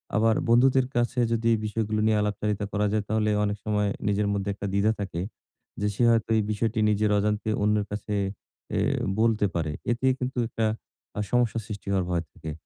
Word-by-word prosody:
আবার 110 +1 +3
বন্ধুদের 130 +2 +4
কাছে 120 +1 +1
যদি, 115 0 0
এই 110 - +1
বিষয়গুলো 110 0 -1
নিয়ে 110 -1 +3
আলাপচারিতা 105 0 -1
করা 105 0 +1
যায়, 105 -1 0
তাহলে 110 -1 +1
অনেক 105 0 -1
সময় 105 -1 +1 0.2
নিজের 105 0 +1
মধ্যে 100 0 -2
একটা 100 0 -5
দ্বিধা 100 +2 +3
থাকে। 90 -4 -3 0.6
যে, 105 - 0
সে 120 - +1
হয়তো 115 -1 +2
এই 110 - +2
বিষয়টি 110 +1 -1
নিজের 105 0 +2
অজান্তে 105 +1 0
অন্যের 105 -1 +2
কাছে 105 0 -3 0.6
এ - - +2 0.4
বলতে 110 -2 +3
পারে। 80 -2 -1 0.2
এতে 120 +3 -1
কিন্তু 130 0 -3
একটা 115 -1 -1 0.5
আ - - +1
সমস্যা 120 -2 +2
সৃষ্টি 100 -2 -8
হওয়ার 95 -2 +1
ভয় 85 -1 0
থাকে। 80 - -7
105 Hz, 185 wpm, -26 LUFS, 105-115 Hz, 0.6 s, বন্ধুদের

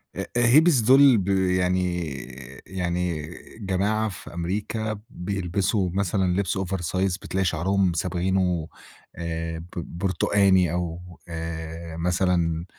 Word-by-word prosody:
أ - - -6 0.2
أ 120 - +4
هيبز 150 +4 +6
دُول 130 +1 +7
ب 95 - -2
يعني 90 -2 +1 0.6
يعني 85 -4 -2 0.3
جماعة 105 +2 0
في 90 - -10
أمريكا 105 +5 -3
بيلبسوا 95 0 -1
مثلًا 95 -1 +1
لبس 100 -1 0
over 95 0 -2 0.2
size 95 0 +1
بتلاقي 95 0 -1
شعرهم 90 +2 +1
صابغينه 90 -1 0 0.5
آآ، 80 -1 -4
ب 85 - -10 0.3
بُرتقاني، 95 -1 +3
أو 85 -1 -2 0.3
آآ 80 0 -6
مثلًا 85 -1 +1
90 Hz, 115 wpm, -25 LUFS, 85-100 Hz, 0.6 s, دُول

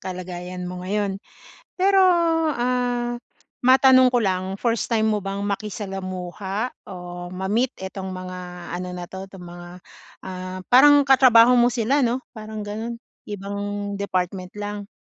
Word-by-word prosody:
kalagayan 180 0 -6
mo 180 0 -6
ngayon. 200 0 -1 0.6
Pero, 390 +1 +4 0.5
ah, 245 -2 -1 0.5
matanong 260 0 +6
ko 245 - +2
lang 190 0 -1
1st 235 +1 -1
time 220 -1 +2
mo 210 - -2
bang 195 +1 -4
makisalamuha 195 +1 -4
o 175 -1 -8
ma-meet 200 +8 0
itong 190 0 -6
mga 185 0 -6 0.4
ano 180 +1 -4
na' 175 -1 -6
to 190 0 -7
tong 190 -2 -11
mga, 175 0 -10 0.6
ah, 185 0 -6
parang 285 +2 +7
katrabaho 250 -3 +7
mo 240 +1 +5
sila 250 +4 +1
,no? 245 +1 0
Parang 215 -1 -7
gano'n, 225 +3 -5 0.3
ibang 205 0 -4
department 185 -1 -2
lang? 205 -1 -5
205 Hz, 130 wpm, -23 LUFS, 185-240 Hz, 0.6 s, parang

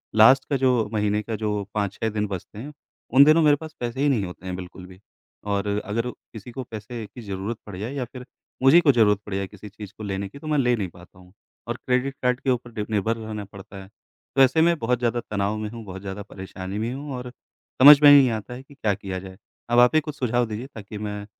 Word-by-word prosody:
Last 130 +5 +6
का 140 - +1
जो 125 -5 +2
महीने 105 0 +1
का 110 +1 -4
जो 105 -1 -2
5-6 105 +2 -2
दिन 105 -1 -2
बचते 100 +2 -7
हैं, 145 +5 -8 0.4
उन 135 +2 +9
दिनों 155 +3 +6
मेरे 145 -1 +6
पास 155 +1 -10
पैसे 120 +2 -4
ही 145 - +3
नहीं 110 -8 +1
होते 90 +1 -10
हैं 90 -1 -4
बिल्कुल 90 0 -9
भी। 95 0 -14 0.5
और 100 0 -1 0.2
अगर 115 +4 -2
किसी 110 +2 -13
को 130 +1 -6
पैसे 110 0 -7
की 120 - -12
ज़रूरत 100 +2 -4
पड़ 100 -3 -8
जाए 115 +7 -5
या 130 -3 -3
फ़िर 125 +1 -11 0.4
मुझे 135 +6 +7
ही - - +7
कोई 145 -5 +4
ज़रूरत 105 -3 +4
पड़ 105 - -7
जाए 100 -1 -2
किसी 105 - -12
चीज़ 105 -1 -10
को 110 - -8
लेने 100 0 -3
की। 140 - -12
तो 155 - -9
मैं 150 -1 +1
ले 125 -2 +3
नहीं 100 -4 -3
पाता 90 +1 -17
हूँ, 90 +1 -18 0.3
और 120 0 -3
क्रेडिट 130 +2 0
कार्ड 125 0 +2
के 135 - -2
ऊपर 120 -1 -1
डि 105 -2 -3
निर्भर 110 +2 0
रहना 110 -2 -6
पड़ता 100 0 -12
है। 95 - -16 0.5
तो 135 - +5
ऐसे 135 +5 +5
में 170 0 +4
बहुत 125 +1 0
ज़्यादा 120 0 0
तनाव 100 +1 -1
में 105 -1 -4
हूँ, 115 0 -9
बहुत 95 0 -8
ज़्यादा 100 +1 -6
परेशानी 95 +1 -7
में 115 +3 -2
हूँ 140 0 -6
और 125 0 -6 0.5
समझ 145 +1 +10
में 145 -1 +9
नहीं 140 -3 +7
आता 110 +2 -5
है 130 +2 -9
कि 140 - -18
क्या 105 -6 0
किया 95 -1 -5
जाए। 95 0 -11 0.3
अब 120 0 +4
आप 125 +5 +5
ही 155 - +5
कुछ 150 -1 -7
सुझाव 120 -1 +1
दीजिए 110 +5 -6
ताकि 105 0 -8
मैं 105 -1 -5
110 Hz, 250 wpm, -24 LUFS, 100-130 Hz, 0.5 s, समझ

